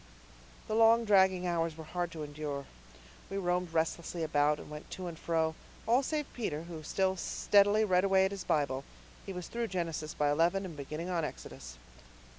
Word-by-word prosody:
The - - -2
long 230 +1 +5
dragging 190 -3 +4
hours 165 -2 0
were 160 - -7
hard 175 +2 -3
to 155 -2 -5
endure. 145 -1 -5 0.6
We 195 - -3
roamed 180 -2 0
restlessly 165 +1 -1
about, 150 -1 +2
and - - -10
went 150 0 -9
to 185 - -6
and 170 -2 -5
fro 160 -1 0 0.3
all 240 +4 +5
save 300 +2 -1
Peter, 165 -10 -3
who 170 -2 -8
still 190 +4 0
steadily 205 +3 +3
read 185 -2 +3
away 190 -1 +4
at 190 - -1
his 200 -2 -5
Bible. 140 -5 0 0.4
He - - -3
was 180 -2 -6
through 235 0 -2
Genesis 165 -5 -3
by 145 -1 +2
eleven 170 +6 +2
and 170 -4 -7
beginning 155 +5 -5
on 170 -2 0
Exodus. - - -7
175 Hz, 185 wpm, -32 LUFS, 155-195 Hz, 0.6 s, long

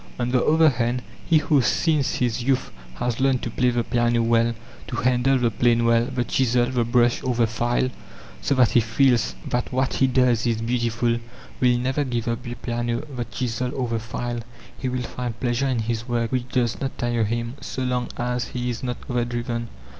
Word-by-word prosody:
On 120 0 0
the 125 0 +2
other 160 0 +5
hand, 125 -1 -1 0.2
he 165 - +5
who 150 -2 +3
since 150 +3 +1
his 120 -1 0
youth 130 +1 0 0.2
has 120 - -2
learned 130 -1 +2
to 120 - -3
play 125 +2 +2
the 120 -1 0
piano 120 0 +1
well, 115 0 +2 0.3
to - - -4
handle 125 +2 +2
the 120 -2 +1
plane 115 +1 +2
well, 115 0 +4
the 125 -1 -1
chisel, 120 -1 +2
the 125 -1 0
brush, 120 0 +2
or 130 -2 0
the 115 0 +3
file, 120 +3 0 0.5
so 140 - +1
that 125 -3 +4
he - - +5
feels 120 +2 +2
that 120 0 -1
what 130 +1 0
he 135 - +3
does 125 -2 +2
is 115 -2 +1
beautiful, 120 0 0 0.4
will 125 -1 +4
never 130 +4 0
give 120 -3 -2
up 115 +1 -1
the 120 -1 -6
piano, 120 -1 -2
the 120 -1 -2
chisel, 125 0 -2
or 130 -3 -1
the 115 -1 -1
file. 120 +2 -4 0.4
He 130 - -3
will 125 0 -2
find 120 -1 -5
pleasure 125 +2 0
in 130 -2 0
his 115 +1 -2
work 115 -2 -1
which 125 -1 -1
does 120 -3 0
not 135 -1 -3
tire 120 -2 0
him, 115 +2 -2
so 130 - -4
long 125 -1 -1
as 125 0 -1
he 125 0 -3
is 115 - -5
not 125 -2 -3
overdriven. 120 -1 -2
120 Hz, 205 wpm, -24 LUFS, 115-125 Hz, 0.5 s, other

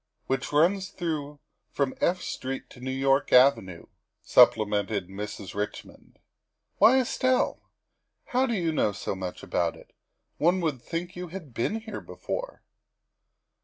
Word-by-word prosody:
" - - -49
Which 135 -1 -2
runs 180 +6 +3
through 150 -4 -4 0.3
from 140 -2 -1
F 180 +1 +2
Street 135 0 -5
to - - -13
New 130 +1 -5
York 135 +1 +1
Avenue, 125 -10 +4
' - - -54
' - - -55
supplemented 105 -3 +4
Mrs. 100 -1 -6
Redmond. 105 +1 -6 0.3
" - - -52
Why, 230 +5 +7
Estelle, 255 0 0 0.6
how 255 +1 +1
do 235 - 0
you 170 -5 0
know 105 -9 +1
so 100 - -4
much 95 -1 -6
about 85 -1 0
it? - - -17 0.5
One 175 +4 +3
would 150 -7 -1
think 175 +4 -5
you 180 0 -5
had 165 -7 -9
been 210 - -1
here 220 -2 -7
before." - - -6
140 Hz, 155 wpm, -27 LUFS, 110-180 Hz, 0.6 s, Why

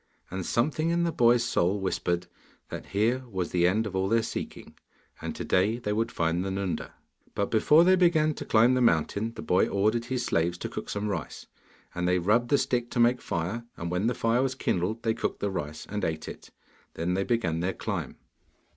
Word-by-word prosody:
And 95 0 -3
something 155 +6 +1
in 170 0 +1
the 170 - +1
boy's 120 -3 +4
soul 100 -4 +1
whispered 90 -2 -1 0.4
that - - -7
here 115 +6 +1
was 95 -4 -3
the 90 -1 +3
end 110 +5 +1
of 100 -2 -5
all 95 +1 0
their 115 +1 +3
seeking, - - -6 0.5
and - - -4
to - - -5
day 100 +5 +2
they 105 -4 -2
would 115 +2 -1
find 85 +2 0
the 95 - -3
Nunda. 95 -1 -3 0.4
But 100 - -1
before 150 +9 +5
they 185 +1 +5
began 165 -4 +3
to - - -7
climb 115 +3 +4
the 130 - +2
mountain 110 +2 +1
the - - -7
boy 90 - +3
ordered 110 +4 +1
his 125 -1 -2
slaves 85 +1 0
to - - -5
cook - - -6
some 105 +1 -2
rice, 100 - -4 0.5
and 90 0 -1
they 90 0 +3
rubbed 105 +7 +2
the 140 - +4
stick 125 -3 -1
to - - -3
make 120 +1 +4
a - - -19
fire, 95 +8 -3
and 85 +1 -4
when 90 +5 0
the 125 - 0
fire 115 +2 +1
was 130 -1 0
kindled 105 -2 -1
they 115 -1 +2
cooked - - -3
the 100 - -1
rice 75 -4 -5
and 105 0 -4
ate 80 -1 -2
it. - - -9 0.5
Then 85 +2 -1
they 95 +1 +1
began 100 -9 0
their 90 +3 -1
climb. - - -4
105 Hz, 215 wpm, -27 LUFS, 90-120 Hz, 0.5 s, before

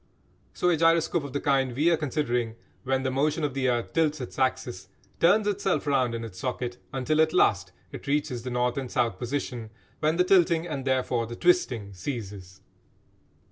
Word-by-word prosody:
So - - 0
a 165 - +2
gyroscope 165 0 +3
of 140 - -7
the 145 - 0
kind 135 -4 +1
we 155 +6 +3
are - - +5
considering, 125 -6 -1 0.3
when 135 0 0
the 130 - 0
motion 150 +4 0
of 145 -3 -1
the 130 -1 0
earth 120 -1 -1
tilts 155 -2 +1
its 125 - -7
axis, 130 -1 -1 0.3
turns 200 +6 +4
itself 200 -4 0
round 130 -5 +1
in 115 - -4
its 95 -5 -10
socket 125 +1 -3
until 140 +4 +1
at 160 0 +2
last 95 -2 +3 0.2
it - - -9
reaches 140 -3 0
the 125 - -5
north 125 0 0
and 130 -2 -3
south 115 -7 0
position, 120 -3 -4 0.3
when 155 +1 +1
the 180 - +5
tilting, 175 -3 +3
and 145 -6 -4
therefore 125 -3 0
the 120 - -7
twisting, 125 - +1
ceases. 95 -3 -7
135 Hz, 185 wpm, -27 LUFS, 120-155 Hz, 0.3 s, are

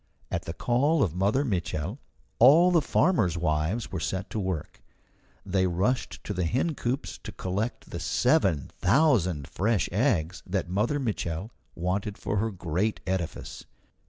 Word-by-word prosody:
At - - -2
the 80 - -4
call 135 - +2
of 85 - -1
Mother 100 +10 +1
Mitchel 95 - -2 0.4
all 160 +9 +7
the 170 -2 +4
farmers' 145 - +2
wives 85 +7 -1
were 95 - -3
set 95 +4 -3
to 110 - -2
work; 95 -6 -4 0.6
they 95 -1 +1
rushed 95 +9 -1
to 105 - -4
the 90 -2 -1
hencoops 130 - -1
to - - -8
collect 100 +6 -3
the - - -4
seven 80 -8 +2
thousand 95 - +3
fresh 105 +2 0
eggs 95 - +1
that 95 0 -1
Mother 105 +11 0
Mitchel 105 - -3 0.2
wanted 95 +4 -2
for 105 - -2
her 110 +3 +1
great 95 +2 -1
edifice. 95 -3 -4
100 Hz, 145 wpm, -27 LUFS, 90-120 Hz, 0.6 s, all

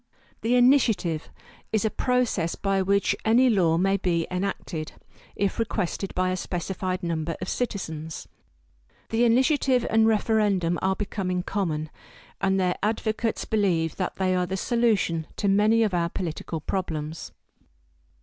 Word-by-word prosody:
The 230 +3 +2
Initiative 240 - +3 0.4
is 220 -1 +1
a 215 - +1
process 245 -10 0
by 195 -1 0
which 200 +1 +2
any 245 +3 +4
law 170 -6 +3
may 195 +3 +2
be 170 -3 0
enacted, 180 -4 -3 0.4
if 200 +1 -1
requested 205 -3 -2
by 185 0 +1
a - - 0
specified 185 +1 -3
number 165 -1 -2
of 185 - -5
citizens. 160 -10 -4 0.8
The 230 +2 +2
Initiative 255 +1 +3
and 220 0 +4
Referendum 205 -6 +2
are 190 0 +1
becoming 190 -3 -2
common, 155 -6 -2 0.5
and 190 0 +2
their 180 -1 +1
advocates 220 +1 -1
believe 175 -7 0
that 185 - -2
they 185 -1 +1
are 180 0 0
the 190 +2 -3
solution 210 -9 +1
to 200 - -1
many 210 +3 +4
of 210 -4 0
our 170 -1 +1
political 165 -2 -4
problems. 160 -3 -4
190 Hz, 140 wpm, -25 LUFS, 175-220 Hz, 0.8 s, any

